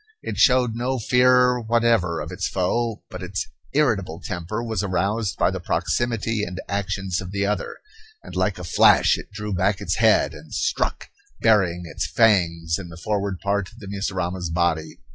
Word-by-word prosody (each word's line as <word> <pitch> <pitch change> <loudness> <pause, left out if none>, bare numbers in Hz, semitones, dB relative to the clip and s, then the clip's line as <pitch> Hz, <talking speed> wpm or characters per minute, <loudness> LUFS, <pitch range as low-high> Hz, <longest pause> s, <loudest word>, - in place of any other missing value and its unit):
It - - -4
showed 125 -3 +4
no 125 +3 -1
fear 125 +1 +4
whatever 115 -7 +1
of 75 +4 -6
its 95 +1 -2
foe, 110 +5 -1
but - - -7
its - - -3 0.3
irritable 100 - +1
temper 90 +5 -4
was 110 -5 -2
aroused 100 +2 -1
by - - +2
the - - -4
proximity 115 -2 -1
and 90 -1 -5
actions 100 -2 -2
of 90 - -7
the 100 +1 -1
other, 105 +1 -2 0.5
and - - -10
like 95 +1 0
a 90 - -7
flash 85 - +5
it - - -9
drew 105 0 -5
back 95 +2 +1
its - - -2
head - - +4
and - - -10
struck, - - -1 0.3
burying 95 -6 +3
its 80 - -3
fangs 85 -7 +2
in 90 -3 -8
the 80 - -11
forward 100 -1 -2
part 100 -1 -1
of 115 - -19
the 110 - -10
mussurama's 95 -3 -3
body. 80 -2 -1
100 Hz, 175 wpm, -23 LUFS, 90-115 Hz, 0.5 s, flash